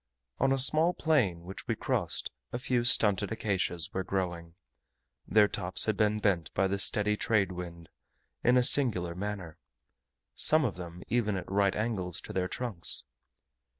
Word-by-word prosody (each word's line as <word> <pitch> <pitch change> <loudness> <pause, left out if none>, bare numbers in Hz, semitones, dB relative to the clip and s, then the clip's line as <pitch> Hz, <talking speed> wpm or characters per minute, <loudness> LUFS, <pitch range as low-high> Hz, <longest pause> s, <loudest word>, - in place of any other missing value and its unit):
On 135 0 +2
a 135 - +2
small 155 +6 +3
plain 115 - 0
which 95 +3 -10
we - - -1
crossed, - - -3 0.2
a - - -3
few 125 -1 -1
stunted 105 -4 +3
acacias 95 -6 -3
were 95 - -2
growing; 85 -3 -4 0.7
their 105 -1 +4
tops 90 -2 +1
had 110 - 0
been 105 -1 +1
bent 100 -6 -1
by 95 - +2
the 100 +1 -2
steady 105 +1 +3
trade 105 -3 0
wind, 85 -2 -9 0.6
in 125 +1 +4
a 125 - +3
singular 105 -11 +3
manner 95 -3 -6 0.7
some 155 -1 +4
of 110 - -2
them 90 0 -9
even 110 -3 0
at 90 0 -8
right 100 0 +1
angles 100 -6 -3
to - - -10
their 90 -1 -1
trunks. 105 -5 -1
100 Hz, 160 wpm, -29 LUFS, 90-115 Hz, 0.7 s, their